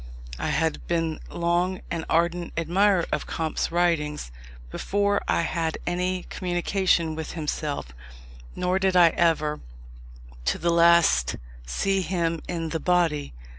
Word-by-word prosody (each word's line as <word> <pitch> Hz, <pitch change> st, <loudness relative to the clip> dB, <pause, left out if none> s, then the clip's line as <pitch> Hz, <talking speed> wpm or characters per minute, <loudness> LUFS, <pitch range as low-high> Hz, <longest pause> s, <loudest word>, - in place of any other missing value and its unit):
I -, -, -2 dB
had 160 Hz, -1 st, -1 dB
been 165 Hz, -2 st, -1 dB
long 175 Hz, +2 st, 0 dB
an 165 Hz, -1 st, -3 dB
ardent 170 Hz, +1 st, +1 dB
admirer 180 Hz, +2 st, +2 dB
of -, -, -2 dB
Comte's 160 Hz, -1 st, -2 dB
writings 160 Hz, -, 0 dB, 0.4 s
before 200 Hz, -, 0 dB
I -, -, +2 dB
had 165 Hz, -1 st, -1 dB
any 180 Hz, +1 st, -1 dB
communication 175 Hz, -2 st, 0 dB
with 160 Hz, 0 st, -5 dB
himself; 150 Hz, -, -3 dB, 0.6 s
nor 180 Hz, +1 st, 0 dB
did 190 Hz, -1 st, +1 dB
I 175 Hz, -2 st, +7 dB
ever, 155 Hz, -3 st, +1 dB, 0.9 s
to -, -, +1 dB
the 170 Hz, +1 st, 0 dB
last, 170 Hz, -, +4 dB, 0.3 s
see 195 Hz, -, 0 dB
him 170 Hz, -3 st, -1 dB
in 165 Hz, -2 st, -3 dB
the 160 Hz, -, -2 dB
body. 165 Hz, -, +1 dB
170 Hz, 130 wpm, -25 LUFS, 160-180 Hz, 0.9 s, I